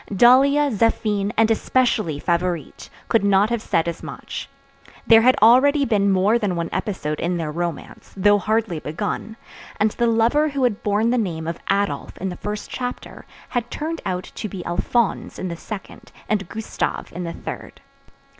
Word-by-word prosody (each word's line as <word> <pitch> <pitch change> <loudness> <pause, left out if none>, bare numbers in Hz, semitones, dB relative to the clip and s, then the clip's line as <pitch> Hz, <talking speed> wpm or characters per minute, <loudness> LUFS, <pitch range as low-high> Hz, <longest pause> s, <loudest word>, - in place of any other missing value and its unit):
Dahlia, 270 +7 +5
Zéphine, 210 -2 +1
and 225 0 +4
especially 225 - +1
Favourite, 170 0 -2 0.2
could 225 - +2
not 200 +2 +3
have 235 -2 0
said 165 -5 0
as 170 - -4
much. - - -7 0.6
There 225 -1 +7
had 255 +2 +5
already 275 +5 +6
been 205 -4 +2
more 195 +5 +3
than 200 -5 -1
one 170 -1 -2
episode 155 -8 -3
in 175 +1 -1
their 160 -2 -3
romance, 170 0 -5
though 205 +2 +4
hardly 215 -4 0
begun; 205 +8 -4 0.4
and 210 +1 +3
the 235 - 0
lover 235 +7 +3
who 275 -2 -2
had 235 -5 +1
borne 210 +3 +1
the 250 - +2
name 165 -7 -3
of 165 - -4
Adolph 200 +1 -1
in 190 - -3
the 180 - -5
first 210 +3 -5
chapter 250 -1 -6 0.2
had 240 -1 -2
turned 320 +2 -4
out 180 -1 -2
to 215 - -5
be 185 -3 -7
Alphonse 225 +6 -1
in 185 - -4
the 170 - -4
second, 195 +3 -9 0.2
and 200 -4 -1
Gustave 220 0 -4
in 180 - -4
the 170 -1 -4
third. - - -8
210 Hz, 175 wpm, -22 LUFS, 180-235 Hz, 0.6 s, There